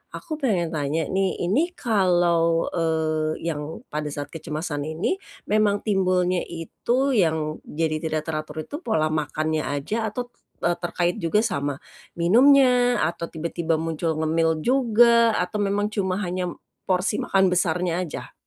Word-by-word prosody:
aku 310 Hz, -, -5 dB
pengen 180 Hz, -, 0 dB
tanya 150 Hz, +2 st, -1 dB
nih, 190 Hz, 0 st, +1 dB
ini 265 Hz, -, +2 dB
kalau, 175 Hz, -6 st, +2 dB
eee, 160 Hz, -2 st, 0 dB
yang 150 Hz, +1 st, -6 dB
pada 150 Hz, 0 st, -3 dB
saat 145 Hz, 0 st, -5 dB
kecemasan 155 Hz, -2 st, -4 dB
ini, 160 Hz, -, -1 dB, 0.3 s
memang 210 Hz, -1 st, +2 dB
timbulnya 185 Hz, -3 st, +2 dB
itu 240 Hz, -, -1 dB
yang 160 Hz, -5 st, +1 dB
jadi 155 Hz, 0 st, -1 dB
tidak 155 Hz, -1 st, -1 dB
teratur 155 Hz, 0 st, -4 dB
itu, 295 Hz, -, -6 dB
pola 160 Hz, -9 st, +1 dB
makannya 155 Hz, 0 st, -1 dB
aja 205 Hz, +11 st, -2 dB
atau, 245 Hz, +3 st, -4 dB
t -, -, -40 dB, 0.3 s
eee, 175 Hz, 0 st, +2 dB
terkait 175 Hz, 0 st, -1 dB
juga 190 Hz, +6 st, +1 dB
sama 145 Hz, -, -1 dB, 0.4 s
minumnya, 245 Hz, +6 st, +5 dB
atau 170 Hz, 0 st, -2 dB
tiba-tiba 165 Hz, 0 st, -2 dB
muncul 160 Hz, 0 st, -2 dB
ngemil 160 Hz, 0 st, +1 dB
juga, 235 Hz, -2 st, +4 dB
atau 180 Hz, +4 st, -1 dB
memang 205 Hz, +1 st, 0 dB
cuma 190 Hz, -4 st, -1 dB
hanya 180 Hz, 0 st, -2 dB, 0.4 s
porsi 185 Hz, +3 st, +1 dB
makan 190 Hz, -1 st, +2 dB
besarnya 175 Hz, 0 st, +1 dB
aja? 180 Hz, -4 st, -5 dB
175 Hz, 140 wpm, -24 LUFS, 160-210 Hz, 0.4 s, minumnya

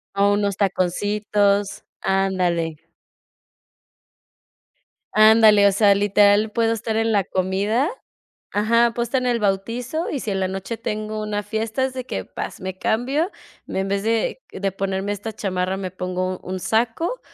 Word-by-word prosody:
O 200 Hz, +1 st, +3 dB
unos 205 Hz, -1 st, 0 dB
taconcitos, 205 Hz, +1 st, 0 dB, 0.2 s
ándale. 180 Hz, -5 st, 0 dB, 2.3 s
Ándale, 215 Hz, -1 st, +7 dB
o -, -, +4 dB
sea, 205 Hz, 0 st, +5 dB
literal 205 Hz, +1 st, +3 dB
puedo 225 Hz, 0 st, +1 dB
estar 225 Hz, 0 st, -3 dB
en 225 Hz, 0 st, +1 dB
la 200 Hz, -3 st, +2 dB
comida. 200 Hz, -, 0 dB, 0.6 s
Ajá, 230 Hz, +3 st, +3 dB
puedo 235 Hz, -, -1 dB
estar 255 Hz, +2 st, -1 dB
en 250 Hz, -, -1 dB
el 240 Hz, -1 st, +1 dB
bautizo, 230 Hz, -, -1 dB
y 280 Hz, -, -3 dB
si 215 Hz, -, -3 dB
en 195 Hz, -, -1 dB
la 190 Hz, -, 0 dB
noche 195 Hz, +4 st, -5 dB
tengo 215 Hz, -1 st, -4 dB
una 210 Hz, -1 st, -2 dB
fiesta, 220 Hz, +4 st, -2 dB
es 260 Hz, -1 st, -1 dB
de 255 Hz, -1 st, -5 dB
que, -, -, -4 dB
¡pas!, -, -, -7 dB
me 190 Hz, 0 st, -5 dB
cambio, 270 Hz, -, 0 dB, 0.4 s
y -, -, -4 dB
en 195 Hz, 0 st, -1 dB
vez 200 Hz, 0 st, -1 dB
de 225 Hz, +3 st, 0 dB
de 195 Hz, 0 st, -2 dB
ponerme 195 Hz, +1 st, -2 dB
esta 205 Hz, +2 st, -5 dB
chamarra, 185 Hz, -2 st, -2 dB
me 190 Hz, -1 st, -5 dB
pongo 185 Hz, 0 st, -3 dB
un -, -, -24 dB
un 185 Hz, -, -3 dB
saco, 240 Hz, -, 0 dB
205 Hz, 160 wpm, -22 LUFS, 195-225 Hz, 2.3 s, Ándale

